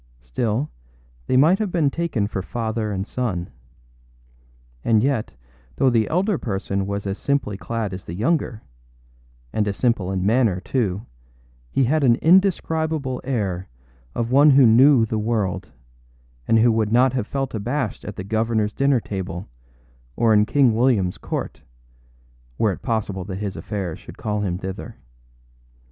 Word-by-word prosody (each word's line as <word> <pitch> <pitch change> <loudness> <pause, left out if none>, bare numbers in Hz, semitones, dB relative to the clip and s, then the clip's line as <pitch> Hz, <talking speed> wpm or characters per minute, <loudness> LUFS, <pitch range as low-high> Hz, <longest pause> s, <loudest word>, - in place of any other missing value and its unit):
Still 110 - -2 0.6
they 130 - +3
might 165 +9 +5
have 210 -4 -1
been 155 -6 +2
taken 160 -11 -1
for 100 -2 -3
father 110 +1 -3
and 95 -1 -2
son. 105 -8 -3 1.3
And 110 -1 +3
yet, 130 -5 -1 0.4
though 135 -2 +3
the 115 -2 +2
elder 185 +2 +1
person 100 -2 -2
was 100 0 -3
as 100 0 -3
simply 140 -8 -1
clad 110 0 -4
as 95 - -7
the 85 - -7
younger, 115 - -1 0.9
and 105 -1 0
as 100 - -2
simple 115 -7 +1
in 95 -1 -1
manner 110 -4 +2
too, 105 -3 -2 0.6
he 135 - +1
had 150 +4 +2
an 120 -3 +5
indescribable 160 -5 +2
air 100 -9 -2 0.5
of 120 0 -2
one 145 +3 +6
who 135 -2 +7
knew 120 +2 +6
the 110 0 -2
world, 105 -4 -2 0.8
and 115 - +4
who 115 +1 +5
would 110 -1 0
not 125 +2 +4
have 125 -5 -2
felt 135 -2 -3
abashed 120 +2 -2
at 105 - -7
the 95 - -6
governorâs 110 0 0
dinner 140 -2 +3
table 95 -3 -5 0.7
or 115 - +3
in 105 0 +4
King 135 -5 +4
Williamâs 110 -6 +1
court, - - -4 1.0
were 110 - +2
it 95 - -7
possible 105 -6 -2
that 95 - -5
his 100 0 -4
affairs 95 -6 -4
should - - -12
call 105 -1 -2
him 90 -3 -1
thither. 95 +5 -7
110 Hz, 155 wpm, -22 LUFS, 100-130 Hz, 1.3 s, who